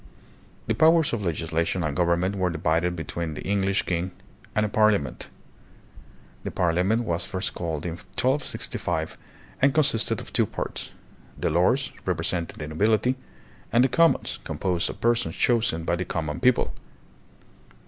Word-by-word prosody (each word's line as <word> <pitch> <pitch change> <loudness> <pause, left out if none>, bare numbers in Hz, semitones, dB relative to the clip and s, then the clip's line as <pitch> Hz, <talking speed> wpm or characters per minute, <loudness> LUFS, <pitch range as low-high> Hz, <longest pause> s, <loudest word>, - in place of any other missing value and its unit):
The - - +1
powers 160 -2 +4
of 115 - -1
legislation 85 +1 -1
and 75 -2 -1
government 90 +3 +1
were 95 -2 +1
divided 85 +2 0
between 80 -1 -4
the - - -6
English 100 0 +1
king 90 +1 -1 0.2
,' - - -26
and 105 - +3
a - - 0
Parliament. 105 - +1 1.1
The - - -3
Parliament 90 +7 +1
was 85 -6 -1
first 95 +1 -3
called 80 -3 -3
in 85 - -2
1265 95 - -2 0.5
and 135 +2 +4
consisted 145 -7 +2
of - - -8
two - - +2
parts, - - -4 0.5
the - - 0
Lords, 105 - +2
represent 85 -1 -1
ing - - -18
the 75 - -5
nobility; 110 +9 +2 0.6
and 120 +2 +5
the 130 - +3
Commons, 165 +4 +2
composed 90 -2 -1
of - - -7
persons 120 0 +1
chosen 115 -9 +2
by 85 - +1
the 90 +1 -3
common 80 -3 -3
people. 125 -1 +3
90 Hz, 150 wpm, -25 LUFS, 85-115 Hz, 1.1 s, and